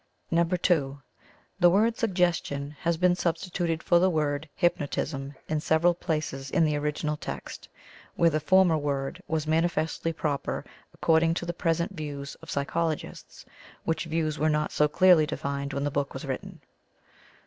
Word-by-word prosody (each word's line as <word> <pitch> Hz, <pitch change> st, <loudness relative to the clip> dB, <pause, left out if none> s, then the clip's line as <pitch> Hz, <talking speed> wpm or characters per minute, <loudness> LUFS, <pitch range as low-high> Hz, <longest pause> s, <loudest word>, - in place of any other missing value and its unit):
(2) 165 Hz, -4 st, +1 dB, 0.6 s
The 175 Hz, -2 st, +7 dB
word 220 Hz, +5 st, +3 dB
"Suggestion" 175 Hz, -, 0 dB
has 170 Hz, -1 st, 0 dB
been 180 Hz, +1 st, +4 dB
substituted 170 Hz, -1 st, -2 dB
for 175 Hz, -, +4 dB
the 185 Hz, +2 st, +4 dB
word 150 Hz, -2 st, -1 dB
"Hypnotism" 145 Hz, -4 st, -1 dB
in 155 Hz, -1 st, 0 dB
several 160 Hz, +3 st, +3 dB
places 155 Hz, -6 st, -3 dB
in 165 Hz, +3 st, +3 dB
the 150 Hz, -1 st, +1 dB
original 150 Hz, +1 st, -1 dB
text, 70 Hz, -, -7 dB, 0.5 s
where 170 Hz, -1 st, +4 dB
the 155 Hz, -, +1 dB
former 180 Hz, 0 st, +4 dB
word 140 Hz, -2 st, -3 dB
was 160 Hz, -1 st, -1 dB
manifestly 165 Hz, 0 st, 0 dB
proper 150 Hz, -3 st, -2 dB, 0.3 s
according 165 Hz, 0 st, +2 dB
to 175 Hz, -, -3 dB
the 175 Hz, -, -3 dB
present 170 Hz, +2 st, 0 dB
views 145 Hz, -3 st, -5 dB
of -, -, -12 dB
psychologists, 155 Hz, +3 st, -3 dB, 0.4 s
which 160 Hz, 0 st, -1 dB
views 155 Hz, -1 st, -1 dB
were 155 Hz, +1 st, +2 dB
not 150 Hz, 0 st, 0 dB
so 150 Hz, -, +3 dB
clearly 160 Hz, 0 st, +5 dB
defined 140 Hz, -1 st, -3 dB
when 140 Hz, 0 st, -2 dB
the 145 Hz, -, -1 dB
book 140 Hz, 0 st, -2 dB
was -, -, -6 dB
written. -, -, -6 dB
160 Hz, 150 wpm, -27 LUFS, 145-170 Hz, 0.6 s, The